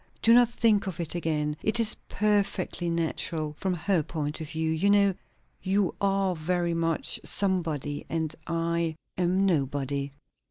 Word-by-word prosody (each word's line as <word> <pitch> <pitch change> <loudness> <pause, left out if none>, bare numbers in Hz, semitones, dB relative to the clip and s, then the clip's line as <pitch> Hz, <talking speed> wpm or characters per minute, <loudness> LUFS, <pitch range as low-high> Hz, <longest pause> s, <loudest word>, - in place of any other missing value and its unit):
"Do 230 - +6
not 240 -1 +6
think 220 -4 +2
of 180 -3 -5
it 165 -3 -2
again. 150 -3 -1
It 220 +2 +2
is 220 -2 +5 0.2
perfectly 200 -4 0
natural, 160 -2 -1
from 190 -2 0
her 175 +1 +1
point 150 0 -4
of 155 - -6
view. 160 -1 -1
You 165 +6 +2
know, 200 -1 +4 0.5
you 195 0 +1
are 195 -2 +1
very 170 +1 -1
much 165 -1 -1
Somebody; 165 -7 -1
and 160 -1 -2
I 170 -1 -1 0.2
am 185 +2 +2
Nobody." 140 -4 0
170 Hz, 150 wpm, -27 LUFS, 160-195 Hz, 0.5 s, Do